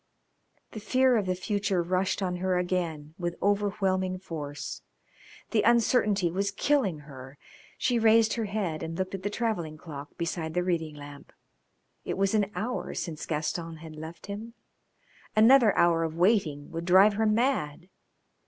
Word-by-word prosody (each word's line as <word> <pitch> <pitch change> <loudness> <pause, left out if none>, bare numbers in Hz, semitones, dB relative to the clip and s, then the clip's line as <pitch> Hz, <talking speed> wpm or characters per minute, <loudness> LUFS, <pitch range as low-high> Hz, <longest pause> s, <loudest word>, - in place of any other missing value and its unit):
The 215 - -7
fear 255 +3 +3
of 205 -4 0
the 185 - 0
future 195 -1 -1
rushed 185 +3 0
on 180 -1 -1
her 185 0 0
again 170 -4 -2
with 175 -1 -2
overwhelming 195 -2 0
force. 150 -6 -6 0.7
The 220 - +3
uncertainty 215 -6 +3
was 200 +3 0
killing 200 - 0
her. 135 -1 -12 0.4
She 245 -2 +1
raised 225 0 +5
her 230 -2 -2
head 195 -6 -2
and 165 0 -5
looked 190 0 -3
at 195 - -4
the 205 - -2
travelling 205 -9 -2
clock 145 -3 -10
beside 165 -1 -3
the 180 - +1
reading 165 -4 -1
lamp. 145 -1 -11 0.7
It - - -3
was 195 +1 +1
an 210 -2 +2
hour 245 +4 -3
since 165 -3 -5
Gaston 165 +2 -3
had 160 0 -10
left 160 +2 -9
him. 215 +4 -7 0.8
Another 225 +1 +7
hour 170 -1 +4
of 160 -1 -3
waiting 170 -6 +1
would 165 0 -5
drive 190 +4 +6
her 220 +2 +1
mad. 215 - 0
185 Hz, 155 wpm, -28 LUFS, 165-210 Hz, 0.8 s, Another